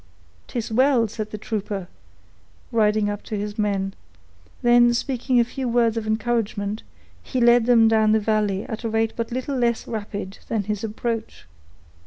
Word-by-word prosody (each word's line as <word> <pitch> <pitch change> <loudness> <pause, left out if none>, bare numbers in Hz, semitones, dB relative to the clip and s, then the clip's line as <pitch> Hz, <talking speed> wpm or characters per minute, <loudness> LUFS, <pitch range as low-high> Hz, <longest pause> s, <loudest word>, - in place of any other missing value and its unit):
"'Tis 235 -2 -4
well!" 255 0 +3
said 215 0 -5
the 215 - -6
trooper, 205 -3 -4 0.8
riding 215 -2 +2
up 205 0 -3
to 215 - -5
his 205 +1 -5
men; 195 -2 0 0.7
then, 240 0 +5
speaking 250 0 0
a - - +6
few 255 +1 -4
words 235 -1 +2
of 225 -1 -3
encouragement, 215 -2 -1 0.4
he 255 - -3
led 240 -1 +5
them 230 -2 +6
down 220 -1 +4
the 220 - +4
valley 210 -2 0
at 220 - -6
a 230 - -1
rate 225 0 0
but 230 0 -3
little 260 +3 -2
less 235 -2 0
rapid 205 -3 -5
than 220 -3 -1
his 210 +1 -3
approach. 225 +1 -4
225 Hz, 165 wpm, -23 LUFS, 210-240 Hz, 0.8 s, a